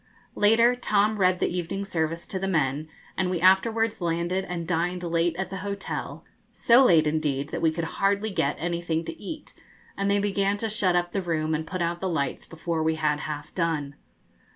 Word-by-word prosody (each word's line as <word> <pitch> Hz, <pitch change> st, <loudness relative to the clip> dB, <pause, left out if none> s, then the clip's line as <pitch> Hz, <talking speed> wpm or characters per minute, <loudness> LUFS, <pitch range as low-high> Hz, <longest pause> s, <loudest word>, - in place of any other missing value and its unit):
Later, 230 Hz, +4 st, +4 dB
Tom 210 Hz, -3 st, +1 dB
read 185 Hz, -1 st, +3 dB
the 180 Hz, -, -1 dB
evening 180 Hz, +3 st, -3 dB
service 165 Hz, -3 st, -2 dB
to 190 Hz, -, -4 dB
the 195 Hz, -, -2 dB
men, 150 Hz, -3 st, 0 dB, 0.3 s
and 185 Hz, -1 st, 0 dB
we 180 Hz, -2 st, -1 dB
afterwards 220 Hz, +4 st, +3 dB
landed 170 Hz, +2 st, 0 dB
and 170 Hz, -3 st, -5 dB
dined 175 Hz, +1 st, -1 dB
late 170 Hz, 0 st, +1 dB
at 190 Hz, +2 st, -4 dB
the 195 Hz, -, -4 dB
hotel; 200 Hz, +1 st, -5 dB, 0.3 s
so 240 Hz, +3 st, +5 dB
late, 165 Hz, -10 st, +5 dB
indeed, 150 Hz, -2 st, -1 dB
that -, -, -4 dB
we 165 Hz, -, +4 dB
could 165 Hz, +1 st, -3 dB, 0.2 s
hardly 200 Hz, +2 st, +2 dB
get 140 Hz, -6 st, 0 dB
anything 170 Hz, -1 st, -2 dB
to 330 Hz, -, -7 dB
eat, 310 Hz, -2 st, -8 dB, 0.4 s
and 200 Hz, 0 st, -1 dB
they 200 Hz, -, +3 dB
began 200 Hz, 0 st, +1 dB
to 225 Hz, +2 st, -2 dB
shut 200 Hz, -4 st, +1 dB
up 175 Hz, 0 st, +1 dB
the 195 Hz, -, -1 dB
room 160 Hz, -3 st, -1 dB
and 155 Hz, +1 st, -2 dB
put 185 Hz, 0 st, -2 dB
out 170 Hz, +1 st, -2 dB
the 190 Hz, -, -1 dB
lights 140 Hz, -5 st, -2 dB
before 165 Hz, 0 st, -3 dB
we 160 Hz, 0 st, +1 dB
had 150 Hz, -1 st, 0 dB
half 150 Hz, -1 st, -6 dB
done. 160 Hz, -5 st, -1 dB
175 Hz, 200 wpm, -26 LUFS, 160-200 Hz, 0.4 s, so